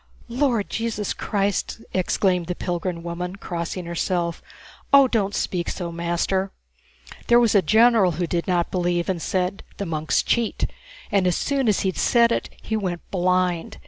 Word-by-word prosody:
"Lord 240 -4 +1
Jesus 225 -2 -2
Christ!" 200 +1 -1
exclaimed 180 -1 +1
the 180 - -2
pilgrim 175 -1 -3
woman, 175 +2 -4
crossing 175 -2 -5
herself. 170 0 -2 0.5
"Oh, 275 -1 +8
don't 205 -5 0
speak 175 -2 -1
so, 175 -2 -4
master! 170 +3 -1 0.8
There 240 0 +6
was 235 -3 +3
a 200 - +5
general 220 -3 +4
who 175 +3 -1
did 170 +2 -2
not 175 -2 +1
believe, 175 -1 0
and 180 -3 -1
said, 185 +2 -1 0.2
'The 200 - -3
monks 155 -2 0
cheat,' 235 -2 0 0.5
and 195 -2 +3
as 180 - +2
soon 275 -3 0
as 210 - +2
he'd 190 -2 -1
said 235 -1 +4
it - - -1
he 220 - -2
went 185 -5 -2
blind. 180 -2 0
185 Hz, 160 wpm, -23 LUFS, 175-215 Hz, 0.8 s, Oh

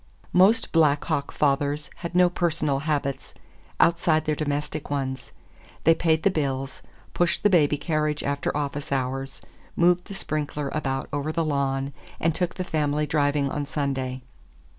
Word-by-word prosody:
Most 205 +6 +4
Black 150 -3 +3
Hawk 145 -4 -1
fathers 145 +1 0
had 170 0 -6
no 180 0 +6
personal 165 -5 0
habits 140 -3 -2 0.4
outside 165 -2 +3
their 155 - +1
domestic 150 0 -3
ones; 130 -2 -3 0.5
they 165 - +6
paid 160 -1 +1
the 200 - +4
bills, 135 -4 -2 0.3
pushed 175 -1 +1
the 205 - +4
baby 150 -5 +4
carriage 150 -1 -1
after 140 +1 -1
office 145 0 -3
hours, 135 0 -2 0.3
moved 175 +1 +3
the 200 - -8
sprinkler 150 -4 -3
about 135 -3 -2
over 145 +2 -1
the 165 0 0
lawn, 140 -2 -1 0.3
and 165 0 +2
took 180 +1 -2
the 185 - -2
family 150 -3 0
driving 145 -1 +1
on 145 -1 -3
Sunday. 135 -3 -2
150 Hz, 150 wpm, -25 LUFS, 140-160 Hz, 0.5 s, no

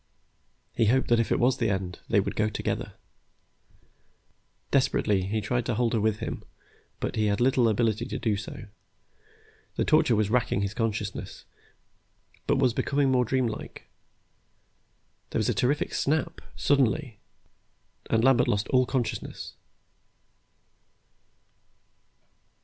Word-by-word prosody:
He 115 - +2
hoped 130 +5 +2
that 120 -1 +4
if 115 - 0
it - - +2
was 125 +2 +3
the 115 -3 +1
end, 95 -3 -3
they 110 -3 +4
would 100 - -2
go 105 0 +1
together. - - -3 1.8
Desperately, 95 -3 +2
he 110 +2 -1
tried 120 +4 -1
to 120 - 0
hold 120 0 +1
her 115 - +1
with 110 0 +1
him, - - -5 0.6
but - - -3
he 110 -1 +1
had 100 0 0
little 125 -1 +3
ability 110 +1 0
to - - -4
do 110 -3 0
so. 105 +1 -7 1.1
The - - 0
torture 115 - +4
was 110 0 +2
still 105 - -4
racking 125 -5 +1
his 100 0 -3
consciousness, 110 -3 -4 1.0
but 145 - +3
was 130 -3 +2
becoming 140 +3 +1
more 125 -1 +3
dreamlike. 120 -2 -3 1.4
There - - -2
was - - 0
a - - +2
terrific 140 +4 0
snap, 160 +3 -1
suddenly, 135 -4 +1 0.9
and 115 0 +2
Lambert 130 -1 +4
lost 105 0 0
all 130 -1 +3
consciousness.... 130 -4 -3
115 Hz, 135 wpm, -27 LUFS, 105-130 Hz, 1.8 s, that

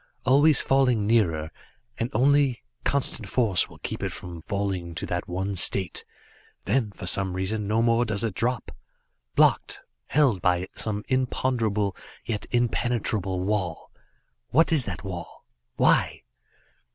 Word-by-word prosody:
Always 145 +3 +5
falling 125 -6 +2
nearer, 85 -9 +1 0.4
and 115 - -2
only 135 +1 +3 0.2
constant 130 -6 0
force 110 -7 +2
will - - -14
keep - - -6
it - - -2
from 85 -2 -8
falling 95 -3 -3
to 85 - -4
that 90 - -3
one 95 +3 -2
state 95 -1 0 0.6
then, 125 -5 +1
for 100 - -9
some 95 +1 +2
reason 100 +3 -2
no 110 +2 +2
more 115 0 +3
does 110 -2 -2
it 110 -4 -1
drop. 120 +5 -2 0.6
Blocked - - +3 0.3
held 135 - +2
by 90 +1 +1
some 105 -1 -4
imponderable, 115 -6 0 0.3
yet 110 -3 -3
impenetrable 115 -6 0
wall. 95 -3 -2 0.6
What 165 +5 +4
is 150 -7 +4
that 90 -5 -5
wall 90 -3 -8 0.3
why? - - +2
105 Hz, 135 wpm, -26 LUFS, 95-120 Hz, 0.6 s, Always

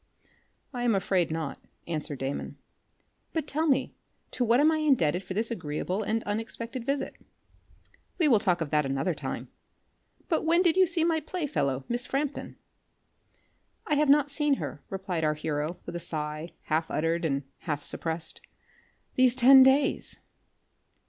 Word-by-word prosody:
"I 245 - -4
am 240 -3 +2
afraid 190 -3 +1
not," 160 -3 -4 0.3
answered 155 -3 -3
Damon. 135 +2 -4 0.8
"But 320 -3 -1
tell 310 +3 -1
me 275 -3 +1 0.4
to 250 - -1
what 235 +1 +4
am 305 +2 +5
I 315 - +1
indebted 235 - +2
for 185 +1 -6
this 225 +3 0
agreeable 180 +1 -3
and 220 +2 -1
unexpected 230 +3 -2
visit?" 275 +3 -2 1.0
"We 330 - +3
will 235 -7 +5
talk 180 -3 +1
of 155 - -3
that 150 -1 +3
another 135 +5 -1
time. - - -6 0.8
But 320 - 0
when 335 +3 +3
did 340 -2 +4
you 375 -1 +5
see 335 -1 +2
my 325 -1 +2
play 320 +2 -4
fellow, 135 - -1
Miss 240 +1 -3
Frampton?" 280 +1 -3 1.3
"I 300 - -1
have 295 0 +3
not 285 0 +5
seen 295 0 +2
her," 145 - -6
replied 190 -4 -3
our 150 0 +2
hero 150 +2 -3
with - - -7
a - - -2
sigh 155 0 -3
half 160 +1 -1
uttered, 165 +2 0
and 140 -3 0 0.3
half 145 -1 -1
suppressed, 160 0 -2 0.7
"these 255 -1 +4
ten 265 +1 +8
days." 270 +2 +3
215 Hz, 160 wpm, -28 LUFS, -, 1.3 s, ten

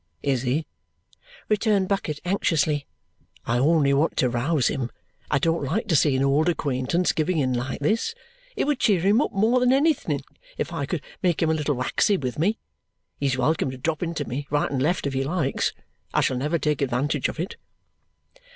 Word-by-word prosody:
"Is 135 -4 +1
he?" 135 +5 0 0.8
returned 210 -2 +2
Bucket 170 -7 -2
anxiously. 155 -6 +1 0.6
"I 120 +1 +1
only 145 0 +3
want 145 +4 +1
to 125 - +3
rouse 125 +4 +1
him. 125 -3 -2 0.4
I - - +3
don't 165 +2 +1
like 165 - -1
to 165 - +3
see 145 -2 +4
an 130 - +1
old 145 +5 +3
acquaintance 145 +2 0
giving 165 +2 0
in 130 -4 +1
like 125 +3 -3
this. 225 - 0 0.4
It - - 0
would 290 -2 0
cheer 200 -6 +3
him 205 +7 +4
up - - -1
more 220 +5 +3
than 250 0 +3
anything 265 - +2 0.4
if 170 - -3
I 140 -4 -2
could 165 -2 -3 0.2
make 175 -3 +1
him 160 - +2
a - - +3
little 150 -2 0
waxy 130 +10 +1
with 130 -3 -4
me. 205 +7 +2 0.6
He's 135 -2 0
welcome 155 +1 +1
to 130 - -6
drop 155 +4 -2
into 165 -5 -3
me, 140 +3 -4
right 145 0 0
and 135 -2 -1
left, 165 +4 +1
if 140 - -1
he 135 0 0
likes. 150 -1 0 0.4
I - - +4
shall 130 - +1
never 150 +6 0
take 150 -3 -1
advantage 140 +2 0
of - - -7
it." 175 - -4
150 Hz, 195 wpm, -24 LUFS, 135-180 Hz, 0.8 s, see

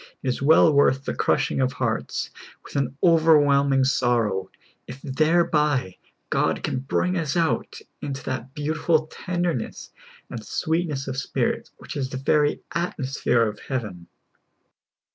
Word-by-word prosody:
It 130 - 0
is 125 - -2
well 155 +2 +6
worth 140 -1 +3
the - - -2
crushing - - +1
of 130 -1 +1
hearts - - -2 0.3
with - - -13
an 135 -1 -1
over 165 -2 +6
whelming 140 -2 +3
sorrow, 115 -7 +1 0.4
if 125 +2 -8
thereb}^ 150 - +1 0.3
God - - +1
can - - -1
bring 180 +7 -1
us 160 0 -2
out 165 -2 0 0.2
into 140 -1 -5
that 130 0 -5
beautiful 155 +1 +1
tenderness 175 -4 -3 0.4
and 115 -3 -7
sweetness 160 0 -2
of 135 -1 -4
spirit 140 - -1
which - - -9
is 135 -3 -2
the 130 - -5
very 145 +2 +1
atmosphere 135 -7 0
of 105 -1 -6
heaven. 105 -10 -5
140 Hz, 140 wpm, -24 LUFS, 130-155 Hz, 0.4 s, well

